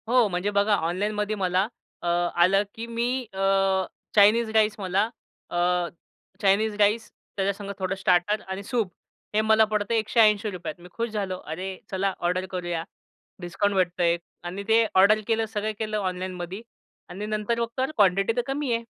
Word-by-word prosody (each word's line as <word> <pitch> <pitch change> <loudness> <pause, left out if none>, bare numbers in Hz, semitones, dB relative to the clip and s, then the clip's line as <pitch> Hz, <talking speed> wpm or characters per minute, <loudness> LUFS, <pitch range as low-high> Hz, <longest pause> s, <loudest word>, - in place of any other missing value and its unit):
हो, 245 -1 +4
म्हणजे 180 +2 -1
बघा 205 +1 +3
ऑनलाईनमध्ये 205 +5 -1
मला 185 0 +1 0.4
अ, - - -2 0.3
आलं 185 +4 +4
की 225 - -5
मी 240 +3 -1
अ, 195 0 +2 0.3
चायनीज 220 +3 +5
राईस 215 -1 +4
मला 190 +1 +1 0.5
अ, - - -3 0.8
चायनीज 205 +2 +3
राईस, 210 +2 +2 0.3
त्याच्या 195 0 +1
संगत 200 0 -7
थोडं 190 0 -1
स्टार्टर 190 +2 +2
आणि 190 +1 -5
सूप 215 -3 -1 0.4
हे 215 - +3
मला 220 0 +5
पडतं 210 0 -1
आहे 225 - +4
₹180 215 -5 +2
त. - - -32
मी 180 - -12
खुश 230 +4 -3
झालो. 200 -4 -3
अरे! 185 +4 -5
चला 195 0 0
ऑर्डर 180 +2 0
करूया. 175 -3 -3 0.6
डिस्काउंट 200 +3 -1
भेटतं 180 -1 +1
आहे 170 0 +3 0.3
आणि 180 +3 -5
ते 225 +1 +5
ऑर्डर 200 +3 +6
केलं, 225 -1 +1
सगळं 215 0 -3
केलं 215 -1 -2
ऑनलाईनमध्ये 185 0 -4 0.5
आणि 195 +4 -5
नंतर 215 +2 -1
मग 235 - 0
तर 260 +3 0
क्वांटिटी 195 +1 +3
तर 245 - +2
कमी 270 -2 -1
आहे. 230 0 -1
200 Hz, 170 wpm, -25 LUFS, 185-220 Hz, 0.8 s, ऑर्डर